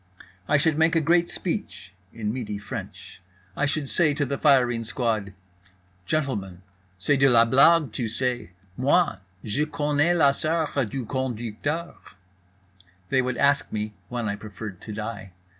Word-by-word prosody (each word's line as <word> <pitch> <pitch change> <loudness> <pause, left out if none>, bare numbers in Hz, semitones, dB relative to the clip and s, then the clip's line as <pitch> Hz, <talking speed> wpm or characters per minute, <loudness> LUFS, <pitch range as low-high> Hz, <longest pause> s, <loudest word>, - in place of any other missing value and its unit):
I 150 - +4
should 155 +1 +1
make 160 +1 +3
a - - +5
great 170 +2 +3
speech 170 - -5 0.2
(in 110 -2 -3
Midi 110 -5 -4
French). 100 -2 -8 0.3
I 145 - +1
should 145 -1 -2
say 150 0 +2
to 145 -1 0
the 140 +1 -3
firing 125 -5 +3
squad: 110 -3 -1 0.8
"Gentlemen, 100 - -2 0.3
c'est 135 +10 +2
de 135 0 +5
la 115 -2 +6
blague, 140 +3 +5
tu 115 +1 -3
sais? 120 -1 -2 0.3
Moi, 145 - +2 0.3
je 140 +8 -1
connais 150 +3 +1
la 140 -4 +5
soeur 155 -2 -1
du 135 -1 -4
conducteur."… 130 +6 -3 1.2
They 130 - +3
would 130 -1 -2
ask 140 0 +2
me 105 0 -3 0.2
when 120 -2 -3
I 100 - -1
preferred 105 -2 -8
to - - -8
die. 105 -3 -6
130 Hz, 150 wpm, -25 LUFS, 110-150 Hz, 1.2 s, la